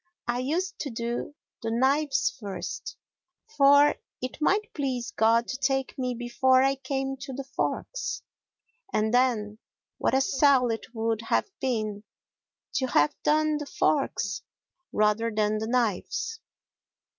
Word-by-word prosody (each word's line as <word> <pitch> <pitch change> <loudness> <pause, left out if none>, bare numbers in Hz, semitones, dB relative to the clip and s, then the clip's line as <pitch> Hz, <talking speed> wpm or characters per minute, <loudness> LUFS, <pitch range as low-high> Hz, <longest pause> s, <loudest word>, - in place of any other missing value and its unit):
I 240 0 0
used 350 +9 -2
to 285 - -3
do 235 +4 -4 0.3
the 225 - -2
knives 270 +4 +2
first, 200 -4 -6 0.6
for 285 0 +6 0.3
it 255 +4 -6
might 425 +8 +1
please 260 - -2
God 230 +2 +3
to 260 - -2
take 270 0 0
me 250 -2 -2
before 255 +2 +3
I 270 0 +3
came 270 0 -3
to 270 +1 -7
the 275 +2 -4
forks, 275 - -3 0.7
and 215 +2 +1
then 225 -4 +2 0.4
what - - +2
a 265 - +4
sell 270 -3 +4
it 225 +1 -6
would 225 0 0
have 420 - +1
been 215 -5 -2 0.7
to 260 - +1
have 150 -10 +3
done 305 0 +2
the 295 - -6
forks 235 -9 0 0.5
rather 215 +2 +2
than 215 -1 0
the 220 - -3
knives! 245 - -1
255 Hz, 135 wpm, -27 LUFS, 225-275 Hz, 0.7 s, for